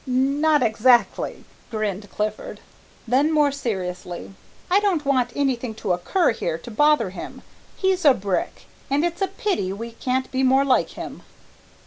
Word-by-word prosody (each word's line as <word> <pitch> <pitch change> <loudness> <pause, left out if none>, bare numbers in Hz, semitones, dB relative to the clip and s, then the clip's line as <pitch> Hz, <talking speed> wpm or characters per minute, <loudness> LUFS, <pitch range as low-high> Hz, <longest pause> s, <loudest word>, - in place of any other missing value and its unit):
"Not 280 +4 +2
exactly," 235 +2 +2 0.3
grinned 210 -3 -3
Clifford. 210 0 -4 0.5
Then 270 +6 +3
more 300 -2 +3
seriously, 180 - -5 0.4
"I 390 - +6
don't 375 -8 0
want 260 -3 +2
anything 255 -5 -1
to 195 -4 -1
occur 215 - +1
here 170 -8 -3
to 200 +8 -10
bother 295 -4 +3
him. 190 - -9 0.3
He's 380 -1 +1
a 285 -4 +6
brick, 195 -1 -3 0.3
and 285 +4 +2
it's 345 +2 -3
a 390 - +2
pity 380 - -2
we 230 +4 -6
can't 255 +2 -2
be 260 - 0
more 265 +1 +4
like 260 -2 +2
him." - - -7
255 Hz, 150 wpm, -23 LUFS, 215-295 Hz, 0.5 s, I